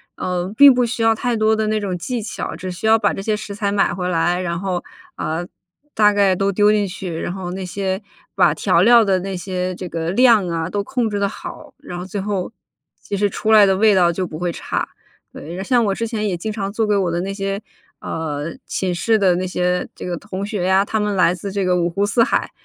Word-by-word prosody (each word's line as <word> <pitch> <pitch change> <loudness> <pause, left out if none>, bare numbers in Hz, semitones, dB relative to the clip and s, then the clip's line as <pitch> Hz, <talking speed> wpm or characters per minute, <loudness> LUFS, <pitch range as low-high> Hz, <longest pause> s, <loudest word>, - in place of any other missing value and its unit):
呃， 180 +1 -3
并 280 0 +9
不 250 -1 +2
需 230 0 -3
要 225 0 +4
太 240 0 -1
多 215 0 +3
的 220 0 -1
那 215 0 +1
种 195 -3 -3
技 235 +7 -3
巧， 210 - -5
只 185 - -6
需 180 +4 -7
要 225 0 +5
把 205 - +1
这 - - -5
些 210 +1 -1
食 200 -1 -7
材 200 -1 -1
买 200 -1 +2
回 180 0 -3
来， 175 +1 +1
然 170 -2 -2
后， 185 -2 -2 0.3
啊， 160 +3 -3 0.5
大 210 -1 +5
概 200 -2 +3
都 195 +2 0
丢 205 +2 +4
进 210 -1 +2
去， 180 -3 -5
然 175 - -3
后 185 -2 -5
那 190 +1 -5
些 190 +1 -3 0.3
把 - - +4
调 - - +2
料 235 -2 +6
的 190 -1 +2
那 190 0 -4
些 185 0 -3
这 180 0 -6
个 165 0 -3
量 230 -2 +5
啊， 165 0 -2
都 200 +1 -2
控 240 +1 -1
制 205 -1 -2
得 200 - +1
好， 300 +6 -9
然 175 - -8
后 180 - -5
最 200 +2 -5
后 195 -1 -3 0.5
其 200 - -4
实 205 +1 +2
出 215 +2 -1
来 215 -2 +8
的 195 -1 +3
味 215 0 +5
道 175 -2 +4
就 185 +2 -2
不 155 - -7
会 175 0 -1
差。 - - -3 0.4
对， 175 +5 -7
像 245 +2 +2
我 200 - +1
之 230 - -2
前 215 -2 -2
也 190 - -1
经 215 +5 -4
常 200 -2 -3
做 220 +1 0
给 210 - +2
我 185 -3 0
的 170 - -1
那 195 +2 -3
些， 195 +1 -3 0.4
呃， 155 0 -4
寝 185 -2 -2
室 220 +5 +2
的 185 -3 +3
那 185 +1 -2
些 180 0 -1
这 - - -8
个 180 - -2
同 195 +1 -5
学 205 -3 -3
呀， 190 +1 +4
他 220 +1 -1
们 210 -1 -1
来 175 -2 +4
自 195 +2 -6
这 200 0 -1
个 180 0 +2
五 170 - +1
湖 200 +4 0
四 230 +3 +3
海， - - 0
195 Hz, 270 characters per minute, -20 LUFS, 180-215 Hz, 0.5 s, 并